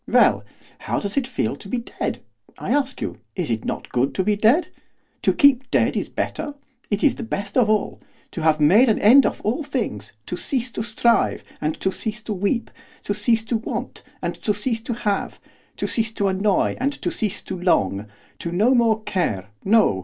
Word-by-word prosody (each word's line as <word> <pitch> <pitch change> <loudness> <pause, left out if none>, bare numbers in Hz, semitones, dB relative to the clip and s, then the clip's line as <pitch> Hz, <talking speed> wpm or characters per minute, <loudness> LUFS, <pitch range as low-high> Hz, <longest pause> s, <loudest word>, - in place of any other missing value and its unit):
Well, - - +4 0.4
how - - -2
does 200 -1 -4
it 275 -3 +1
feel 255 - -1
to 195 - -12
be 250 - -1
dead? 235 - -4 0.3
I - - -4
ask 275 -2 0
you! - - -4 0.2
Is 175 -9 -2
it 115 0 -2
not - - -4
good 130 +2 0
to 190 - +1
be 210 +2 +2
dead? 225 - +3 0.5
To - - +3
keep 265 -2 +4
dead - - +2
is - - -2
better, 290 - -3 0.3
it 205 -1 -1
is 290 - +4
the - - -5
best 205 -3 -4
of 240 -4 +4
all! 215 -1 0 0.3
To 170 - -5
have 155 -1 +3
made 200 - +6
an 215 - +3
end 250 +6 +7
of - - -4
all 235 +9 -1
things, 225 - -3
to - - -4
cease 250 +5 -2
to - - -4
strive 220 +1 +1 0.2
and 155 +1 -2
to 190 - +1
cease 220 +3 -4
to 215 - -3
weep, 205 +5 -1 0.3
to 205 - -1
cease 220 +2 +1
to 225 +1 0
want 225 - -5 0.2
and - - -1
to 210 - +1
cease 225 +1 -1
to 240 +1 -3
have, 210 -4 -2 0.4
to - - -2
cease 225 -1 0
to 200 -3 +1
annoy 195 +1 +1
and 275 +3 0
to - - -3
cease 210 -4 -2
to 185 - -5
long, 100 - +1 0.3
to 170 - -4
no 215 +9 +3
more 225 -3 +3
care, 105 - -1
no! 205 - +4
215 Hz, 205 wpm, -22 LUFS, 190-240 Hz, 0.5 s, end